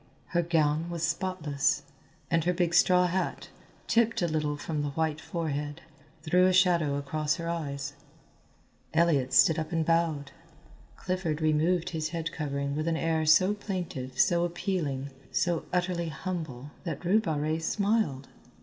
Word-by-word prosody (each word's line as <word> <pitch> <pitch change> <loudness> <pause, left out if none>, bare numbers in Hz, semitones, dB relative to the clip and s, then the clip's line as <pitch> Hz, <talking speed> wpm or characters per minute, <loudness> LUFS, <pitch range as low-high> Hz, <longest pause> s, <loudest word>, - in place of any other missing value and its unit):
Her 175 - +2
gown 160 -1 +1
was 170 -1 -4
spotless, 165 -5 0 0.5
and 165 -1 +3
her 180 - +2
big 175 -1 0
straw 180 +1 +5
hat, 185 +1 -2 0.4
tipped 230 -4 +2
a - - +2
little 150 -2 -1
from 150 +1 -3
the 145 - -1
white 155 +1 -1
forehead, 150 -2 -3 0.4
threw 180 +3 +4
a 185 - +3
shadow 170 -6 +3
across 150 +2 -1
her 170 -1 -5
eyes. 145 -4 -3 1.0
Elliott 145 -6 +3
stood 160 +3 +5
up 160 - -4
and 165 -2 0
bowed. 165 -4 +1 0.6
Clifford 180 -5 -2
removed 160 +3 +2
his 155 -2 -2
head 165 0 -3
covering 140 -2 -3
with 155 +2 -2
an 165 -1 +1
air 160 -1 0
so 185 +6 +5
plaintive, 175 -11 -5
so 170 -1 +4
appealing, 165 -6 -2 0.2
so 175 -2 0
utterly 175 -2 0
humble 150 -4 -5
that 165 -1 -5
Rue 205 +5 +4
Barrée 155 -2 -1
smiled. 200 -7 0
165 Hz, 150 wpm, -29 LUFS, 150-175 Hz, 1.0 s, straw